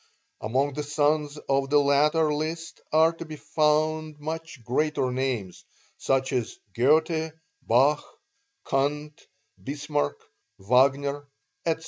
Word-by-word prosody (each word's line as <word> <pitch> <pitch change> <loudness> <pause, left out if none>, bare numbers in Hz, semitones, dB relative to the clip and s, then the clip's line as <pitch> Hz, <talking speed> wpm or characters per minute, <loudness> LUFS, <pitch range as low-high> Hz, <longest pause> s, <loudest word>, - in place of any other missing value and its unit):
Among 135 +6 0
the 150 - -3
sons 150 0 0
on 135 0 +1
the 145 - +4
latter 150 +2 +3
list 160 +2 -4
are 160 +2 +5
to 165 - -8
be 155 -1 -8
found 155 0 0
much 160 -3 -6
greater 130 +2 0
names 125 -8 -3 0.4
(such 135 0 0
as 125 -3 -2 0.2
Goethe, 160 - +2 0.3
Bach, 135 +6 +3 0.6
Kant, 145 +2 -1 0.4
Bismarck, 145 +1 -2 0.4
Wagner, 140 +6 +2 0.4
etc.) 160 -1 +1
145 Hz, 110 wpm, -26 LUFS, 135-155 Hz, 0.6 s, are